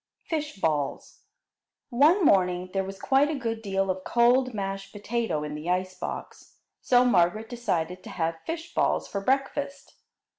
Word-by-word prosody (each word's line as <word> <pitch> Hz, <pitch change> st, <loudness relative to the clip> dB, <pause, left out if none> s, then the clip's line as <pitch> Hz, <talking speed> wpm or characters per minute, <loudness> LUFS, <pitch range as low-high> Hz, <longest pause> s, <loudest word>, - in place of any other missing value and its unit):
Fish 305 Hz, -2 st, -3 dB
balls 150 Hz, -5 st, -2 dB, 0.7 s
One 310 Hz, +9 st, +5 dB
morning 180 Hz, -3 st, +3 dB
there 195 Hz, -1 st, +1 dB
was 195 Hz, 0 st, -8 dB
quite 275 Hz, +2 st, +3 dB
a 315 Hz, -, -1 dB
good 230 Hz, -3 st, -3 dB
deal 195 Hz, -2 st, 0 dB
of 185 Hz, 0 st, -6 dB
cold 245 Hz, +3 st, +3 dB
mashed 195 Hz, -2 st, -4 dB
potato 205 Hz, -6 st, -2 dB
in 150 Hz, 0 st, -5 dB
the 150 Hz, +3 st, -5 dB
ice 185 Hz, +1 st, 0 dB
box, 185 Hz, -, -7 dB, 0.3 s
so 250 Hz, 0 st, +4 dB
Margaret 215 Hz, 0 st, +2 dB
decided 185 Hz, -7 st, -2 dB
to -, -, -8 dB
have 165 Hz, -1 st, -2 dB
fish 330 Hz, +1 st, -5 dB
balls -, -, +1 dB
for 200 Hz, -, -4 dB
breakfast. 275 Hz, +3 st, -1 dB
200 Hz, 155 wpm, -27 LUFS, 180-255 Hz, 0.7 s, One